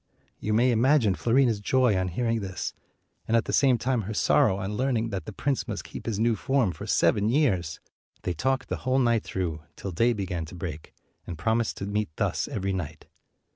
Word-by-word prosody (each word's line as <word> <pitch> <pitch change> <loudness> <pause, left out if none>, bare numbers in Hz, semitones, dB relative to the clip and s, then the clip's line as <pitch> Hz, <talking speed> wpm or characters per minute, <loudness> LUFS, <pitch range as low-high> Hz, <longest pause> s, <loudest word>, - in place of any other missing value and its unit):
You 105 0 -1
may 125 +3 +4
imagine 120 -2 +4
Fiorina's 120 +1 +2
joy 125 +1 +2
on 95 0 0
hearing 115 +5 0
this, 95 -4 -4 0.5
and 115 - +3
at 115 - +1
the - - -3
same 130 -3 +4
time 125 0 0
her 105 +2 -5
sorrow 95 -1 +3
on 100 +1 -3
learn 130 +2 +1
ing 115 +1 -1
that 95 -4 -4
the - - -6
prince 135 +6 -1
must - - -4
keep - - -9
his 110 -3 -1
new 115 0 +3
form 135 -5 +1
for - - -8
seven 105 +1 +3
years. 95 - +1 0.4
They 90 - -1
talked 130 - -1
the - - -1
whole 130 0 0
night 120 -4 +2
through, 85 -5 -3
till 95 - -6
day 115 +8 +2
began 90 -6 -3
to 80 - -11
break, 80 -3 -7 0.3
and 85 - -5
promised 110 +6 0
to 100 - -4
meet 105 +1 -1
thus - - -1
every 100 -1 -2
night. 80 -5 -5
110 Hz, 210 wpm, -27 LUFS, 95-120 Hz, 0.5 s, may